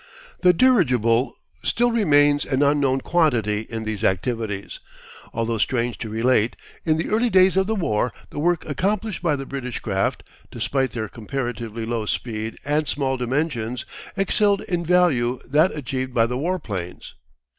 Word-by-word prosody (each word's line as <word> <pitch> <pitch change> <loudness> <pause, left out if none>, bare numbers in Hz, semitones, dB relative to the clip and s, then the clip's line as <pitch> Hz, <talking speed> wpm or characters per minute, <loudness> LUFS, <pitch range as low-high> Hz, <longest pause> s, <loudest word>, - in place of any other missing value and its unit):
The 180 - +6
dirigible 130 - +3 0.2
still 240 +1 +2
remains 145 -10 +4
an 135 +1 +1
unknown 140 -2 +2
quantity 115 - +1
in 115 -1 -4
these 110 -1 -4
activities, 105 0 -1 0.5
although 115 -1 -1
strange 120 +2 0
to 110 - -5
relate, 115 +1 +2 0.3
in 155 -1 +2
the 160 - -2
early 230 +3 +2
days 190 -2 +5
of 190 0 +2
the 220 - 0
war, 120 - 0 0.2
the - - -5
work 175 +2 +1
accomplished 200 - -1
by 160 -4 +2
the 135 -1 -5
British 130 -3 -5
craft, 95 -2 -1 0.3
despite 135 -1 -1
their 110 -3 -3
comparatively 115 -1 -4
low 115 -2 -2
speed 110 -1 -3
and 150 +1 +1
small 135 -2 0
dimensions, 125 -2 -2 0.3
excelled 200 +1 +2
in 175 -2 -2
value 155 -9 +2
that 155 +6 +3
achieved 130 -2 -4
by 115 - +4
the 125 +2 -3
warplanes. 125 - -4
130 Hz, 150 wpm, -23 LUFS, 115-165 Hz, 0.5 s, The